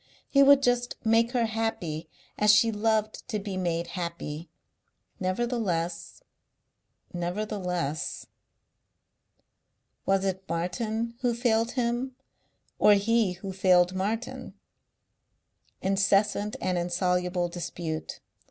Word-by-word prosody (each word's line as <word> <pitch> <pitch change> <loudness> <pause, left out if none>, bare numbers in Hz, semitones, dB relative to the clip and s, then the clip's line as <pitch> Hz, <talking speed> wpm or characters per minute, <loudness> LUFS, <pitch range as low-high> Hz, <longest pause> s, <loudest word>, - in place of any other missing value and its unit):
He 275 - +4
would 280 0 +7
just 245 -1 +1
make 230 +2 +3
her 240 -2 +2
happy 180 -8 -3 0.3
as 210 0 +5
she 210 +2 +5
loved 215 0 0
to 220 - -2
be 200 -1 -5
made 170 -2 -1
happy.... 170 -3 -5 0.7
Nevertheless. 185 -5 -2 0.9
Nevertheless.... 180 -3 -3 1.8
Was 195 0 +2
it 190 0 -3
Martin 215 +7 -2
who 245 -2 +1
failed 230 -1 +1
him 245 +1 -1 0.6
or 210 - +7
he 215 -1 +2
who 190 +2 -7
failed 180 -1 +4
Martin? 215 +6 -3 1.3
Incessant 200 +2 +2
and 180 -1 0
insoluble 180 0 0
dispute. 170 -2 -5
195 Hz, 95 wpm, -28 LUFS, 175-225 Hz, 1.8 s, would